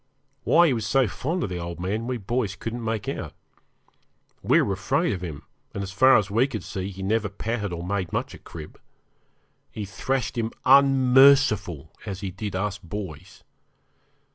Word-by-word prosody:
Why 170 +1 +6
he 150 - +3
was 110 -4 -2
so 135 -1 +3
fond 160 - -3
of - - -2
the 90 -1 -4
old 85 0 -6
man 105 +6 -2
we 125 -1 -2
boys 115 -1 -2
couldn't 115 +4 -5
make 110 -2 -2
out. - - -4 1.1
We - - +4
were - - -1
afraid - - 0
of 90 - -5
him, 80 -5 -6 0.3
and 100 - -2
as 95 - -6
far 130 +8 +6
as 100 -2 -1
we 115 +6 +3
could 110 -9 -5
see 95 0 -4
he 95 0 -8
never 105 +1 0
patted 105 0 -3
or 85 -1 -5
made 95 -2 -2
much - - -2
of - - -13
Crib. 80 -2 -10 0.9
He 105 - -6
thrashed 125 +5 -2
him 115 0 -2
unmerciful 130 - +5
as 100 -3 -6
he 95 -2 -4
did 100 +1 -5
us 100 +1 -2
boys. 90 -3 -8
105 Hz, 180 wpm, -25 LUFS, 95-125 Hz, 1.1 s, Why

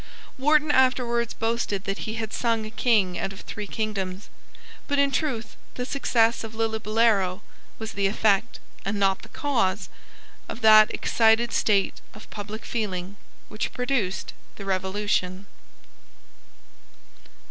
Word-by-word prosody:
Wharton 300 +2 +3
afterwards 245 -3 +2
boasted 225 -3 -1
that 195 0 -3
he 220 - -3
had 220 -1 -4
sung 230 -2 0
a 215 - -7
King 210 -7 +2
out 195 - -2
of 195 - -10
three 210 -1 -6
kingdoms. 200 -3 -4 0.6
But 285 - 0
in 280 0 +3
truth 240 -6 -2 0.2
the 250 - -3
success 235 -5 +1
of 225 0 -8
Lillibullero 220 -3 +1 0.4
was 220 -1 -5
the 200 0 +1
effect, 210 +2 +1 0.2
and 200 +1 -2
not 195 -1 +2
the - - -13
cause, 225 -10 -1 0.6
of - - -6
that 215 -1 +7
excited 230 +1 +2
state 200 -3 +1
of 215 - -12
public 210 +1 -7
feeling 195 -4 -3 0.3
which 215 - -4
produced 250 -7 -1 0.2
the 200 - -8
Revolution. 190 0 -1
220 Hz, 130 wpm, -25 LUFS, 195-235 Hz, 0.6 s, that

